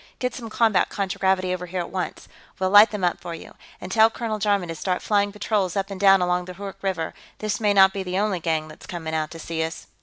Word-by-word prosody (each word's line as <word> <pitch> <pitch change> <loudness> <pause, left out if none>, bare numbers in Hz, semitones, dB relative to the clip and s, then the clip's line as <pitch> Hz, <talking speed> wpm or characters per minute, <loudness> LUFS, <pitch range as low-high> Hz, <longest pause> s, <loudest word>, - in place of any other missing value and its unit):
Get 250 0 -2
some 230 -3 -7
combat 220 -3 +2
contragravity 190 -1 0
over 180 0 -5
here, 180 +1 -3
at 170 - -7
once. 185 -1 -4 0.3
We'll 185 0 0
light 205 +2 +9
them 210 -3 -5
up 175 - 0
for 170 -1 -6
you. - - -12 0.3
And 180 - -8
tell 220 +2 +6
Colonel 225 -2 -4
Jarman 200 -4 +1
to - - -2
start 180 +3 -2
flying 205 -1 +2
patrols 205 -3 -1
up 195 0 -2
and 195 - -6
down 195 -2 +6
along 180 0 0
the 180 0 -9
Hoork 200 +1 -8
River; 185 -5 -2 0.2
this 215 -1 -2
may 210 -2 +2
not 190 -1 +7
be 195 - -3
the 185 0 -3
only 200 -2 0
gang 160 -2 -1
that's 155 - -13
coming 160 -3 -5
out 155 -1 -1
to 165 - -9
see 165 0 -3
us." 160 +1 -5
190 Hz, 250 wpm, -24 LUFS, 175-205 Hz, 0.3 s, light